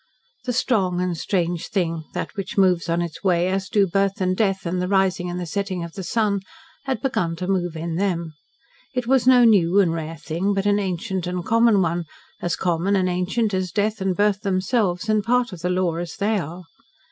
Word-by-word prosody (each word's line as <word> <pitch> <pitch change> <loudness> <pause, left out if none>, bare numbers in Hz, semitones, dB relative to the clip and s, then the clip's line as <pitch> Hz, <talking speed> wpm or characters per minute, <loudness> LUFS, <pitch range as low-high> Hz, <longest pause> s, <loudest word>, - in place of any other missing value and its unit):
The 250 - -1
strong 195 -8 +1
and 180 -1 -1
strange 175 -1 -1
thing 165 -5 -1
that - - -4
which 195 -1 -5
moves 180 -3 +3
on 170 +1 +1
its 170 +2 -7
way 180 -2 +2
as 190 0 -2
do 205 -2 +3
birth 195 +1 0
and 185 -1 +1
death, 195 -2 0
and 180 +1 -1
the 180 - -1
rising 190 -2 +1
and 175 0 -4
setting 190 +1 -2
of 170 -1 -8
the 195 - -6
sun 210 0 +1 0.5
had 265 0 -2
begun 175 -11 0
to 180 +2 -5
move 175 -3 0
in 165 +1 -3
them. 170 -4 -1 0.6
It 250 -1 -1
was 255 0 +2
no 250 -1 +7
new 195 -4 +5
and 175 -5 +3
rare 165 0 -5
thing, 175 +7 -1
but 195 0 -1
an 205 0 +3
ancient 190 -1 -2
and 180 -1 -3
common 230 -3 +4
one 170 0 -1 0.4
as 175 -1 0
common 180 +2 0
and 185 -1 +2
ancient 185 +5 0
as 185 -2 -1
death 215 0 -1
and 190 -1 0
birth 205 0 +2
themselves; 190 0 0
and 215 -1 +2
part 245 -1 +1
of 180 - -8
the 180 - -1
law 180 -2 0
as 170 -2 -5
they 210 +1 +1
are. 170 +2 -7
185 Hz, 210 wpm, -23 LUFS, 175-205 Hz, 0.6 s, no